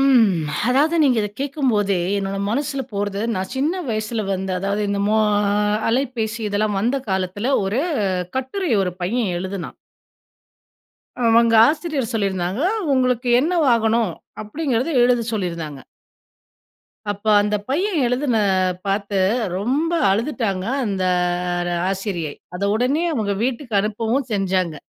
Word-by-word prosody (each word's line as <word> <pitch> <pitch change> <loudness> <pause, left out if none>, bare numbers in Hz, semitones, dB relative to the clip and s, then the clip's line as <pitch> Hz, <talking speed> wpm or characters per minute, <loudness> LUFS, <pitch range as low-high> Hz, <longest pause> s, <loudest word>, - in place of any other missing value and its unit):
ம். 255 -6 +5 0.4
அதாவது 295 +6 +3
நீங்க 260 -4 +3
இத 210 - -2
கேக்கும்போதே, 245 - 0 0.2
என்னோட 195 0 -3
மனசுல 275 +2 -1
போறது 200 0 -2
நான் 185 0 -3
சின்ன 325 +7 0
வயசுல, 215 +1 -2
வந்து 190 0 -3
அதாவது 200 +2 -1
இந்த 200 0 -1
மோ 215 +1 +3 0.7
அலைபேசி, 235 -3 -1
இதெல்லாம் 205 0 0
வந்த 245 +6 +1
காலத்தில 190 +7 -1
ஒரு 210 +7 0 0.6
கட்டுரை, 265 +7 -2
ஒரு 180 -2 -2
பையன் 215 +1 0
எழுதுனான். 190 0 -5 1.5
அவங்க 230 0 +4
ஆசிரியர் 300 -6 -1
சொல்லிருந்தாங்க, 195 0 -1 0.3
"உங்களுக்கு 250 -1 +1
என்னவாகணும்," 235 - +2 0.3
அப்படிங்கிறத 260 +4 -1
எழுத 245 -1 +3
சொல்லிருந்தாங்க. 170 -9 -4 1.3
அப்ப 205 0 -6 0.2
அந்த 210 +1 -1
பையன் 360 +8 0
எழுதுன 250 0 0 0.5
பாத்து 200 0 -1 0.4
ரொம்ப 275 - 0 0.2
அழுதுட்டாங்க. 210 -3 -1 0.2
அந்த 195 -3 -2 0.9
ஆசிரியை, 190 -6 -3 0.2
அத 195 - -7
உடனே 260 +9 +1
அவங்க 215 -6 -1
வீட்டுக்கு 245 -2 -3
அனுப்பவும் 225 +5 -1
செஞ்சாங்க. 185 -4 0
225 Hz, 115 wpm, -21 LUFS, 195-265 Hz, 1.5 s, ம்